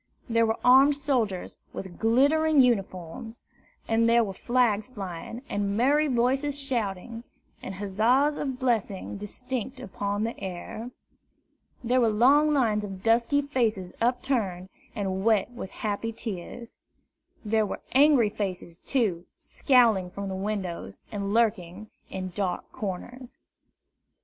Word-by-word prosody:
There 230 -1 +2
were 220 - 0
armed 270 +3 +6
soldiers 250 -10 -1 0.2
with 190 -3 -8
glittering 285 +7 +3
uniforms, 225 -1 0 0.4
and 230 0 +3
there 235 0 +5
were 195 -3 -4
flags 235 -1 +1
flying, 205 +1 -7
and 200 0 -1
merry 290 +6 +3
voices 270 +3 +1
shouting, 230 -4 -3 0.4
and 195 - -6
huzzas 225 +9 +2
and 270 -4 -3
blessings 215 -6 -1
distinct 250 +4 -5
upon 205 -3 -3
the 230 +1 -2
air. 190 +5 -6 0.9
There 250 +2 +2
were 230 - +4
long 275 +8 +4
lines 225 -7 +2
of 195 -2 -7
dusky 235 +5 +3
faces 225 -10 -1
upturned, 230 -7 0 0.3
and 190 -3 -2
wet 220 0 +2
with 240 -6 -7
happy 215 +3 -3
tears. 225 +1 -7 0.7
There 215 0 +2
were - - -5
angry 270 -5 +5
faces, 185 -5 -5
too, 200 -10 -1
scowling 230 -9 +3
from 190 0 -5
windows, 190 - -4
and 200 -1 -3
lurking 210 -3 0 0.2
in 185 -1 -5
dark 185 -3 -3
corners. 240 +5 -6
225 Hz, 125 wpm, -27 LUFS, 195-255 Hz, 0.9 s, armed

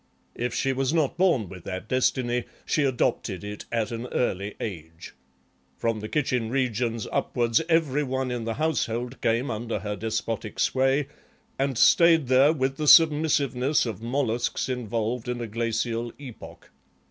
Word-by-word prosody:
If 120 0 -3
she 135 -1 +1
was 135 +1 0
not 155 -4 +1
born 170 - +2
with 90 -1 -11
that 95 +2 -5
destiny 125 -1 0 0.2
she - - +1
adopted 120 -6 -1
it 105 0 -7
at 115 -1 -1
an 115 +2 -4
early 100 -5 -2
age. 80 -5 -7 0.6
From 115 -2 -1
the 105 +1 -6
kitchen 125 -6 0
regions 120 -3 -1
upwards 120 +1 +1
every 155 -4 +2
one 130 -2 -2
in 120 -2 -3
the 115 -1 -2
household 125 -5 -2
came 115 +4 +1
under 115 0 -3
her 105 0 -3
despotic 110 0 -3
sway 135 +2 +2 0.5
and 135 -2 0
stayed 165 -3 +5
there 130 +3 +6
with 135 -3 -1
the 155 - -2
submissiveness 145 -4 +4
of 110 -2 -5
molluscs 120 0 -1
involved 120 0 -2
in 125 0 -2
a 120 - -3
glacial 115 +1 -2
epoch. 130 -6 -11
125 Hz, 150 wpm, -26 LUFS, 115-135 Hz, 0.6 s, there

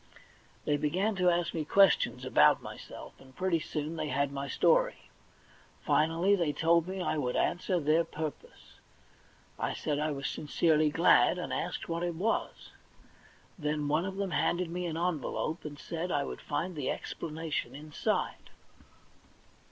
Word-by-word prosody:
They 145 - +2
began 185 +9 0
to 180 -1 +4
ask 170 -1 0
me 160 - -1
questions 195 +5 +3
about - - +5
myself, - - -9
and 130 -1 -17
pretty 185 -3 +1
soon 155 +1 -4
they 155 - -2
had 140 0 0
my 140 0 -4
story. - - +2 0.7
Finally 165 +6 +3
they 170 -6 0
told 165 +3 +3
me 190 +1 -4
I 155 - 0
would 125 -3 -1
answer 180 +1 +1
their 155 +2 +3
purpose. 155 -2 -8 0.8
I - - -1
said 145 -2 -2
I 155 +1 0
was 140 -2 -3
sincerely 155 0 +2
glad, 165 +3 +4
and 180 - -4
asked 175 +1 -3
what 170 0 -2
it 175 -1 -2
was. 210 +7 -2 0.9
Then 150 -1 -1
one 155 +4 +1
of 190 0 -4
them 195 -2 -2
handed 175 -1 0
me 180 0 -3
an 160 -1 -3
envelope, 165 -1 -2
and 145 -1 -6
said 170 +4 -4
I 145 -3 +1
would - - -6
find 180 0 -3
the 145 -4 -2
explanation 160 -2 -4
inside. 150 +1 -2
165 Hz, 155 wpm, -30 LUFS, 150-175 Hz, 0.9 s, about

